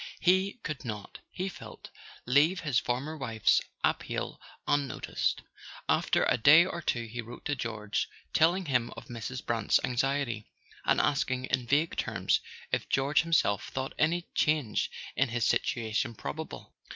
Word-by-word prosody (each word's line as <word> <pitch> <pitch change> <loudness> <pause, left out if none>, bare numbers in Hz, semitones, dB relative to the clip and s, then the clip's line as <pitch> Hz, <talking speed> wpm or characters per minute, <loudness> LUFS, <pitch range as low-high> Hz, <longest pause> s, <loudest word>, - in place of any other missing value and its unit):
He 190 +2 +3
could 150 -3 -4
not, 105 -5 -6
he 185 +1 -3
felt, 190 - -10 0.3
leave 145 +8 +4
his 145 -6 +2
former 135 +6 -2
wife's 115 -7 +2 0.2
appeal - - -1 0.3
unnoticed; 145 -1 0 0.4
after - - +2
a - - +3
day 155 +8 +8
or 170 -2 -4
two 120 -6 0
he 120 +2 -5
wrote 120 +2 -11
to 145 - 0
George, 110 -5 -2 0.2
telling 175 +4 +3
him 125 -5 +1
of - - -10
Mrs. 120 +2 -5
Brant's 115 -2 +2
anxiety, 125 -3 -1 0.4
and - - +3
asking 130 -2 +1
in 125 -2 -1
vague 150 +6 +2
terms - - +1 0.3
if - - -1
George 140 +2 +3
himself 160 - +1
thought 130 0 -4
any 170 +3 +2
change 150 -8 +1 0.3
in 135 -1 +2
his 120 0 0
situation 115 0 0
probable. 70 -8 -7
135 Hz, 145 wpm, -30 LUFS, 115-155 Hz, 0.4 s, day